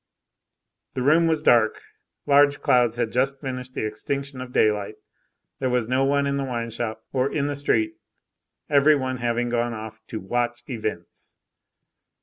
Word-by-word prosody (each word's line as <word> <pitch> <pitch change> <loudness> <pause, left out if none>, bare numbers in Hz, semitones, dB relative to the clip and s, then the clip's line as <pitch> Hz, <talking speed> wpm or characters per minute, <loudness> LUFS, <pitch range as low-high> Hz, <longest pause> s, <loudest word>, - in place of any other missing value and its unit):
The 125 - -1
room 160 +5 +4
was 160 -2 0
dark, 115 -5 +4 0.5
large 145 0 +4
clouds 120 -2 +3
had 120 -2 -1
just 135 +2 0
finished 130 -2 -6
the - - -2
extinction 135 +5 -4
of 130 -1 -8
daylight. 105 -2 +1 0.6
There 130 - 0
was 125 -2 0
no 130 +2 +1
one 140 +1 +2
in 140 0 0
the 140 - -1
wine 120 -3 -3
shop, 110 -1 -4
or 130 +1 +1
in 145 -2 0
the 145 0 -2
street, 325 - 0 0.7
every 145 +1 +5
one 130 -2 -2
having 120 0 -1
gone 120 -1 -1
off 110 0 -8
"to 110 - -5
watch 120 +4 -2
events." 110 -8 -6
125 Hz, 160 wpm, -24 LUFS, 115-140 Hz, 0.7 s, every